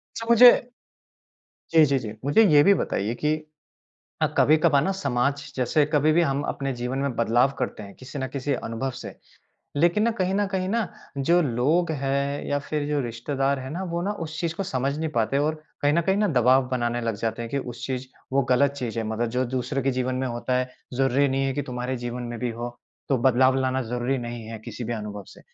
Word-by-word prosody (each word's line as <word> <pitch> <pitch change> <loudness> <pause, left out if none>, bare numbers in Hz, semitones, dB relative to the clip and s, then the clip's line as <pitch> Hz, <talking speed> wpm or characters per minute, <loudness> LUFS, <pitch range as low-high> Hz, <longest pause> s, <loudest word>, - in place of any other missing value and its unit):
अच्छा 230 - -5
मुझे 240 +1 +10 1.2
जी, 160 -1 +7
जी, 140 -1 +2
जी। 110 -4 -6
मुझे 220 +11 +5
ये 145 -1 +7
भी 200 +4 +6
बताइए 110 - -1
कि 155 +1 +3 0.9
अ, - - +5
कभी-कभार 155 -2 +4
ना 195 - 0
समाज 140 +1 -1
जैसे 130 +4 +2
कभी 150 +1 +4
भी 170 - +4
हम 140 -3 0
अपने 135 -1 -2
जीवन 125 +2 -3
में 140 -2 -1
बदलाव 120 +3 +3
करते 125 -4 -3
हैं 100 -1 -11
किसी 135 +2 -9
ना 130 - -2
किसी 140 +1 -3
अनुभव 120 +2 -3
से - - -8 0.6
लेकिन 175 +7 +3
ना 235 - +3
कहीं 185 +1 +1
न 205 0 +1
कहीं 190 -1 -2
ना 225 -2 0 0.3
जो 170 +6 +3
लोग 150 +7 +1
है 140 +1 -1
या 145 - +1
फ़िर 145 +1 -3
जो 150 -1 0
रिश्तेदार 135 +3 -1
है 130 +1 -7
ना 180 +3 -4
वो 170 - -1
ना 205 +3 -1
उस 155 0 -8
चीज़ 170 -2 -1
को 195 - -1
समझ 135 -3 -1
नहीं 160 0 -1
पाते 115 +5 +1
और 150 +2 +1 0.3
कहीं 145 0 +3
न 170 - +3
कहीं 190 +3 +1
ना 210 0 +2
दबाव 130 +1 +4
बनाने 120 -2 -1
लग 115 -1 -1
जाते 115 +1 -2
हैं 115 - -6
कि 140 - -1
उस 125 -3 -6
चीज़ 130 -1 -3 0.3
वो 140 0 +3
ग़लत 140 +2 +4
चीज़ 120 -5 -4
है। 115 - -1
मतलब 110 +2 -1
जो 130 - +2
दूसरे 135 +2 -1
के 135 - +1
जीवन 130 0 -1
में 130 +1 -1
होता 125 +1 -1
है, 130 0 -1 0.3
ज़रूरी 135 +2 +2
नहीं 135 +1 0
है 135 - 0
कि 145 - -1
तुम्हारे 125 0 -4
जीवन 120 +1 -5
में 120 - -6
भी 125 0 -2
हो, 120 +1 -5 0.4
तो 135 -3 +2
बदलाव 130 +1 +4
लाना 130 0 0
ज़रूरी 125 +3 -1
नहीं 120 -1 -6
है 110 0 -7
किसी 120 - -6
भी 120 - -3
अनुभव 105 -3 -5
से। - - -16
135 Hz, 225 wpm, -25 LUFS, 120-150 Hz, 1.2 s, मुझे